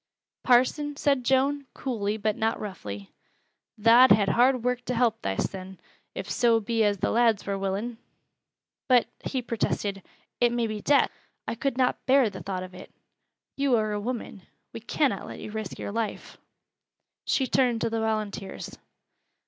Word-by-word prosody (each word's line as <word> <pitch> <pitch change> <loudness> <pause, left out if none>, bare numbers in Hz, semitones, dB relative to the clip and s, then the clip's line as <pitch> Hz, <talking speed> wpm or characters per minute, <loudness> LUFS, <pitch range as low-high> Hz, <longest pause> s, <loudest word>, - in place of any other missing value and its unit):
"Parson," 265 +4 +3
said 280 -3 +1
Joan, 275 +2 +1
coolly 215 -5 -2
but 215 0 0
not 225 +1 0
roughly, 100 - -7 0.7
"tha'd 230 +4 +7
ha' 200 -1 +5
hard 250 0 +3
work 250 0 -1
to 250 - -2
help 235 -2 +1
thysen, 185 - -3 0.4
if - - -5
so 230 -2 +3
be 225 +1 0
as 205 -1 +2
th' - - -23
lads 230 -3 +2
wur 200 - -1
willin'!" 200 +5 -3 0.9
"But," 250 -2 +5 0.2
he 260 -2 -2
protested, 205 -4 -2 0.4
"it 240 -1 +4
may 240 -1 0
be 215 -1 -4
death. 285 +5 +3 0.4
I - - -1
could 255 +2 -2
not 255 -1 +1
bear 260 -4 +4
the 190 -2 -8
thought 185 -2 -4
of 185 0 -10
it. 185 - -12 0.6
You 275 -2 +2
are 215 -2 0
a 210 - -2
woman. 225 -3 -5 0.3
We - - -6
cannot 230 -1 -1
let - - -8
you - - -8
risk 220 -2 -5
your - - -5
life." 225 0 -4 0.9
She 265 - +2
turned 250 -3 +2
to 230 - 0
the 225 - -1
volunteers. 215 -3 -4
225 Hz, 165 wpm, -27 LUFS, 205-250 Hz, 0.9 s, tha'd